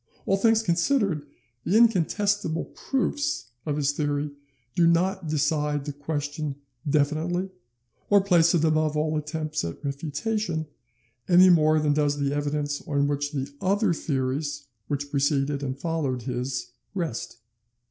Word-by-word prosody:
All 195 - +3
things 225 +2 +3
considered, 175 - +1 0.4
the 195 +6 +2
"incontestable 205 -5 +2
proofs" 275 - -2 0.2
of 150 -1 0
his 145 -1 +2
theory 145 0 -1 0.4
do 170 -1 +4
not 175 +1 +2
decide 150 -1 0
the 145 - -4
question 145 0 -3 0.3
definitely, 160 +6 +1 0.6
or 205 - +6
place 175 -3 +4
it 165 - +2
above 155 -1 +2
all 155 +1 0
attempts 155 0 -2
at 85 - -6
refutation, 160 +5 -2 0.6
any 180 +1 +8
more 155 -2 +4
than 150 -1 +2
does 145 -1 +1
the 140 -1 0
evidence 145 0 -1
on 140 -1 +1
which 145 0 -1
the 140 -1 -4
other 195 0 +2
theories 140 0 -2 0.2
which 145 0 -3
preceded 140 0 +1
and 135 -1 -3
followed 140 -6 -2
his 125 +1 -3 0.2
rest. 160 - -3
150 Hz, 135 wpm, -26 LUFS, 145-175 Hz, 0.6 s, any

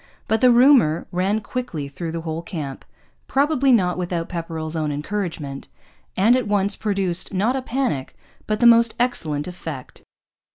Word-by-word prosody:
But 220 - +1
the 255 - +6
rumour 240 - +5
ran 195 +4 0
quickly 220 - -4
through 160 +4 -6
the 165 0 -4
whole 160 0 -4
camp, 155 -7 -6 0.4
probably 275 -1 +2
not 185 -6 +2
without 175 -2 -3
Pepperrell's 165 -2 -5
own 155 -2 -1
encouragement, 150 -3 -4 0.5
and 220 +6 +5
at 255 -4 -1
once 200 0 +1
produced, 195 -3 -1
not 220 +7 +1
a 265 - -1
panic, 255 - -2 0.3
but 215 0 -1
the 240 - +3
most 235 -1 +6
excellent 160 -12 -1
effect. 160 -7 -8
185 Hz, 155 wpm, -22 LUFS, 160-235 Hz, 0.5 s, the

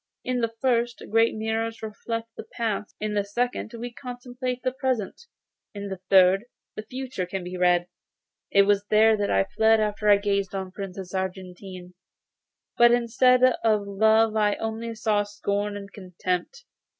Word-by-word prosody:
In 250 -1 -1
the 230 -1 0
first, 240 -2 0
great 225 +1 +3
mirrors 225 +1 -3
reflect 230 +1 -5
the - - -7
past; 220 -3 -3
in 215 0 -2
the 205 -1 +1
second, 240 +3 -2
we 240 +1 -6
contemplate 250 0 -6
the 255 - +1
present; 260 - -3 0.5
in 200 0 -5
the 190 -1 -6
third, 190 +2 +5 0.3
the - - -4
future 250 -5 -5
can 190 0 -4
be 180 +1 -6
read. 180 -1 +2 0.6
It 200 - +5
was 200 0 +2
here 220 +1 +5
that 205 -1 -1
I 95 - +3
fled 220 - +3
after 210 0 0
I - - +9
had 200 0 +1
gazed 200 -1 0
on 190 -1 -4
the - - -20
Princess 190 -1 -7
Argentine, 185 -1 -6 0.9
but 240 0 +7
instead 245 +1 +3
of 225 -5 +3
love 220 +2 +3
I 210 -1 +2
only 225 +1 -4
saw 215 -2 +1
scorn 205 0 -3
and 200 0 -10
contempt. 185 - -4
215 Hz, 165 wpm, -25 LUFS, 195-230 Hz, 0.9 s, I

